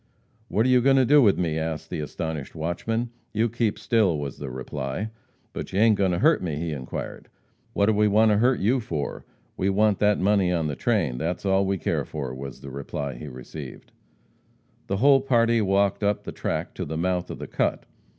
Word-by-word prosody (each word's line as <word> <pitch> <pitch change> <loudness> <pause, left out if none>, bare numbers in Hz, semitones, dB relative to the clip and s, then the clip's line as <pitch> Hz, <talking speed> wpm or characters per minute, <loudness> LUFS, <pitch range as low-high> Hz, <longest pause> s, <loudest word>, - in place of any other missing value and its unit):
"What 110 +2 +1
are - - +3
you 125 -1 +5
going 135 +2 +4
to 130 -1 +4
do 145 +3 +6
with 105 -6 +4
me?" 80 -3 -1
asked 80 0 -4
the - - -3
astonished 75 0 -5
watchman. 110 +9 -2 0.2
"You 110 +2 +2
keep 115 -2 -1
still," 105 -7 +2
was 70 -2 -5
the 70 - -5
reply. 65 - -4 0.4
"But - - -6
you 95 - 0
ain't 110 0 +5
going 100 -2 +1
to 90 - 0
hurt 155 - +4
me?" 80 -5 -2
he 80 +2 -3
inquired. 65 -4 -6 0.4
"What 100 - +2
do 110 - +3
we 105 0 +3
want 110 +2 +4
to 105 - +3
hurt 125 +4 +3
you 120 +7 +2
for? 80 -11 -4 0.3
We 95 - +1
want 105 0 +2
that 105 0 +3
money 100 -2 +2
on 85 -3 0
the 75 -2 -2
train, - - 0
that's 85 +6 -3
all 95 0 +2
we 95 0 0
care - - -1
for," 70 -5 -5
was 65 0 -8
the 70 - -8
reply 70 0 -4
he 60 +5 -9
received. 65 -2 -9 1.0
The 100 - -1
whole 135 +4 +5
party 115 -3 +3
walked 100 0 +2
up 105 0 0
the - - -6
track - - -3
to - - -4
the 80 +1 -4
mouth 90 +1 -1
of - - -6
the - - -6
cut. - - -1
95 Hz, 215 wpm, -25 LUFS, 75-110 Hz, 1.0 s, do